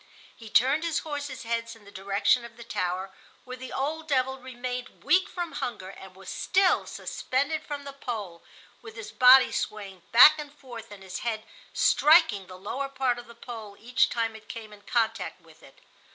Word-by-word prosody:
He 225 -2 -12
turned 270 +8 +3
his 335 -2 0
horses' 290 -3 -5
heads 230 0 -3
in 220 -2 -19
the 200 - -14
direction 200 +5 +1
of 235 -1 -12
the 235 - -9
tower, 185 -3 -3 0.3
where 255 0 -7
the 255 0 -9
old 310 +4 -3
devil 265 -2 0
remained 250 -1 -6
weak 370 +1 +3
from 350 -2 -4
hunger 190 -6 -5
and 190 -1 -12
was 190 0 -14
still 380 - +2
suspended 285 +4 -2
from 290 -1 -6
the 280 0 -8
pole, 215 -11 -6 0.4
with 225 -2 -11
his 225 -2 -8
body 255 +1 +7
swaying 195 -3 -4
back 305 +6 +9
and 295 -1 -7
forth 235 -5 -10
and 205 -2 -12
his 190 +1 -6
head 220 -2 -3 0.3
striking 230 - +4
the 185 - -10
lower 260 +9 -4
part 260 -3 0
of 240 - -11
the 235 - -13
pole 225 -4 -9
each 245 +3 +2
time 225 -1 -1
it 215 -1 -14
came 220 -2 -8
in 205 - -15
contact 225 -5 -1
with 165 -1 -20
it. 135 - -17
235 Hz, 190 wpm, -27 LUFS, 205-265 Hz, 0.4 s, back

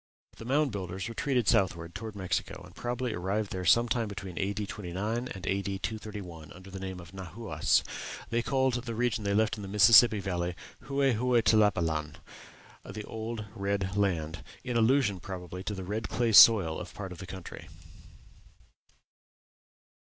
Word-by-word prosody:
The 115 - -9
Mound 140 +2 +2
Builders 95 -1 -4
retreated 120 0 -1
southward 85 -4 +1
toward 110 -2 -7
Mexico, 95 -3 -3
and - - -15
probably 120 -1 -3
arrived 100 +3 -2
there 95 -1 -3
some 120 +8 +5
time 115 -1 0
between 100 -3 -7
A.D. 100 +2 -1
29 105 +6 -3
and 95 -6 -8
A.D. 100 0 -1
231, 95 -7 -6
under 95 +2 -13
the 95 - -7
name 95 -1 -6
of 85 -2 -12
Nahuas. 95 +4 0 0.5
They 120 0 +2
called 130 +1 +1
the 115 -2 -4
region 115 -2 0
they 100 0 0
left 110 +1 +2
in - - -7
the 100 - -6
Mississippi 105 +2 +7
Valley 90 -2 -2 0.3
"Hue 140 0 -1
Hue 125 -2 +3
Tlapalan" 85 -9 +2 0.7
the 105 +2 -7
old, 110 +1 -5
old 105 - -9
red 100 -2 -2
land 85 -6 -1 0.2
in 125 - -3
allusion, 115 -4 +3
probably, 90 0 -7
to 105 - -3
the 95 - -6
red 105 +4 -3
clay 120 -1 +1
soil 100 -7 +8
of - - -9
part 95 -3 -6
of 90 - -9
the 95 - -8
country. 95 -2 -9
100 Hz, 165 wpm, -29 LUFS, 95-115 Hz, 0.7 s, soil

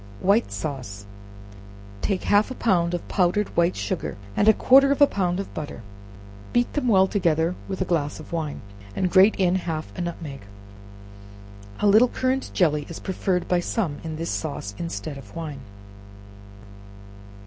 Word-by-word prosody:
White 205 +5 +2
Sauce. 125 -9 -5 1.0
Take 195 -2 -1
half 205 +3 +3
a 260 - -6
pound 175 -7 +1
of 175 - -6
powdered 195 +2 +1
white 170 +1 +2
sugar, 185 - -3 0.2
and 215 +1 +4
quarter 275 +2 +6
of 280 - +1
a 285 - +9
pound 185 -7 -1
of 195 - -6
butter, 145 -6 -6 0.7
beat 240 0 +1
them 285 -4 -1
well 190 -4 +5
together 170 -4 +1
with 190 -1 -4
a - - -6
glass 155 -5 -1
of 155 - -11
wine, 160 -3 -3 0.3
and 185 -2 0
grate 195 +3 +6
in 180 -2 +2
half 160 -3 -5
a - - -4
nutmeg. 165 -6 -5 1.4
A - - +2
little 215 +5 +6
currant 260 +2 -1
jelly 150 -5 +1
is 165 - -7
preferred 185 -1 -1
by 180 - +2
some 175 -4 -2
in 160 -1 -5
this 165 +2 -3
sauce 140 -10 -4
instead 100 - -5
of 105 -7 -14
wine. 150 -5 -6
175 Hz, 160 wpm, -24 LUFS, 155-200 Hz, 1.4 s, a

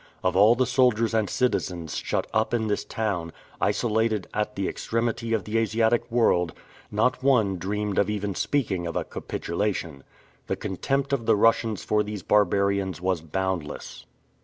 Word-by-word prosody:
Of 95 -1 +1
all 105 +5 +6
the 130 +1 +2
soldiers 120 -3 +2
and 110 -3 +1
citizens 90 -10 -1
shut - - -1
up 110 +2 +1
in 110 -2 0
this 105 -1 -1
town, 95 -7 -2 0.3
isolated 110 -3 +1
at 105 0 -2
the 100 -1 -1
extremity 115 0 -2
of 110 -4 +1
the 110 +3 0
Asiatic 115 +1 +1
world, 90 -8 +2 0.4
not 120 +5 +1
one 115 -8 +3
dreamed 105 +2 -1
of 100 - +2
even 105 -1 -2
speaking 95 -9 -1
of 85 - -5
a - - 0
capitulation. 85 -6 -3 0.4
The - - 0
contempt 135 +8 -2
of 120 -5 -1
the - - +5
Russians 110 -1 +2
for 105 0 +2
these 105 -3 -5
barbarians 100 -3 +2
was 90 -2 0
boundless. 85 -2 -4
105 Hz, 160 wpm, -26 LUFS, 95-115 Hz, 0.4 s, all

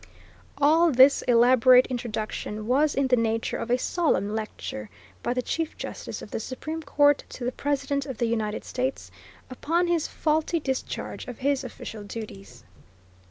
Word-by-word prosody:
All 315 +4 +4
this 265 +2 +6
elaborate 250 +1 +6
introduction 215 -3 -4
was 285 +5 +2
in 275 - +2
the 255 -1 +4
nature 225 -1 -1
of 230 - -5
a 245 - +3
solemn 255 - 0
lecture 220 +3 -5 0.3
by - - -1
the 250 - -1
Chief 325 +3 -3
Justice - - -6
of - - -11
the - - -2
Supreme 310 +8 -5
Court 290 -1 +3
to 245 - -7
the 250 - 0
President 280 0 -2
of 265 -4 -5
the 235 - +1
United 220 -2 -2
States 260 +1 -3 0.4
upon 330 +7 0
his 345 -3 0
faulty 315 +2 0
discharge 265 -3 -4
of 250 - -7
his 275 0 0
official 225 -3 -8
duties. 200 - -9
255 Hz, 160 wpm, -26 LUFS, 230-290 Hz, 0.4 s, this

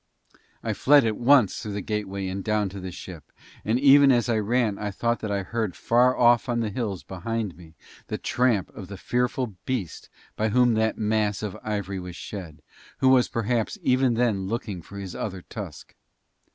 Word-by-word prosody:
I - - -1
fled 145 -2 +5
at 110 -1 0
once 125 -3 +4
through 105 - -5
the 100 - -3
gateway 100 -1 -3
and 95 +1 -4
down 105 -2 0
to 100 +1 -8
the 95 0 -6
ship, 85 -3 -10 0.3
and 115 +3 +1
even 140 0 +7
as 120 -1 +2
I 110 -2 +2
ran 110 -1 0
I 105 - -2
thought 115 +4 -1
that 110 - -4
I 100 -1 -1
heard 110 -2 -3
far 125 +2 +3
off 120 0 +4
on 120 -1 +1
the 110 -2 -2
hills 100 -5 -3
behind 110 0 -4
me 80 -2 -15 0.3
the - - -3
tramp 120 -6 +1
of 95 - -8
the 100 0 -8
fearful 125 +1 -1
beast 110 -11 -3 0.3
by 110 +1 0
whom 120 +2 +4
that 110 0 +1
mass 105 -1 0
of 105 -3 -4
ivory 100 -3 -3
was 90 -1 -8
shed, 90 -7 -8 0.3
who 130 - +3
was 130 -2 +5
perhaps 115 0 -1
even 130 -1 +3
then 110 -5 +1
looking 105 -4 -4
for 100 +5 -12
his 95 -2 -6
other 95 -4 -5
tusk. - - -9
110 Hz, 190 wpm, -25 LUFS, 100-120 Hz, 0.3 s, even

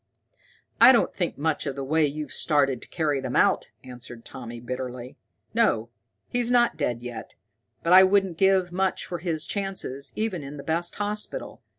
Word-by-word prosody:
"I - - +11
don't 240 - +2
think 175 -3 -2
much 155 +1 -1
of 135 - -3
the 140 - -4
way 155 +2 +2
you've 150 +1 -5
started 140 -5 +1
to - - -10
carry 150 -4 -1
them 130 -1 -4
out," - - +3 0.2
answered 120 -2 -11
Tommy 120 -2 -8
bitterly. 125 0 -6 0.4
"No, 115 +1 +2 0.4
he's 245 -1 -1
not 240 -5 +3
dead 120 -6 -2
yet, 120 -2 -8 0.5
but 170 - +3
I 185 - +10
wouldn't 190 -3 +3
give 190 -2 +3
much 190 +1 -1
for 175 - -5
his 165 -2 -2
chances, 190 -9 -3
even 215 -6 -2
in 140 +1 -8
the 140 - -8
best 165 +3 -1
hospital. 210 - -4
155 Hz, 175 wpm, -25 LUFS, 130-190 Hz, 0.5 s, I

